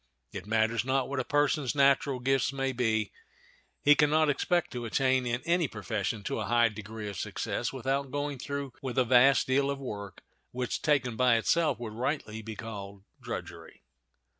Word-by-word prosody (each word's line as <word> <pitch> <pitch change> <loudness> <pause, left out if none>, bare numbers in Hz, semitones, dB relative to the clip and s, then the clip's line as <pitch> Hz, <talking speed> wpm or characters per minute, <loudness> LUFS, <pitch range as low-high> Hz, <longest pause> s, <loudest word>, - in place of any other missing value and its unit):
It 95 0 -7
matters 110 +1 +1
not 130 +1 0
what 140 -1 -3
a - - 0
person's 145 -1 +1
natural 140 -1 +3
gifts 135 +1 +1
may 135 -1 -1
be, 110 -4 0 0.7
he 145 - +7
can 150 0 +3
not 155 0 +3
expect 175 +4 0
to 120 -2 -5
attain 130 +2 +1
in 120 +1 -2
any 170 -1 +2
profession 105 -2 -3
to - - -3
a 105 - -2
high 120 +2 +3
degree 110 0 -7
of 100 - -6
success - - -3
without 135 +1 -2
going 145 -1 -3
through 140 -1 -4
with 130 -1 -5
a 130 - +4
vast 130 +3 +5
deal 140 +2 +2
of 140 - -1
work, 100 -7 -7 0.3
which, 125 0 -3
taken 130 -6 +1
by 125 0 +4
itself, 150 +4 +2
would 115 -3 -6
rightly 115 -2 -3
be 110 0 -7
called 100 -3 -8 0.2
drudgery. - - -8
125 Hz, 180 wpm, -29 LUFS, 110-140 Hz, 0.7 s, he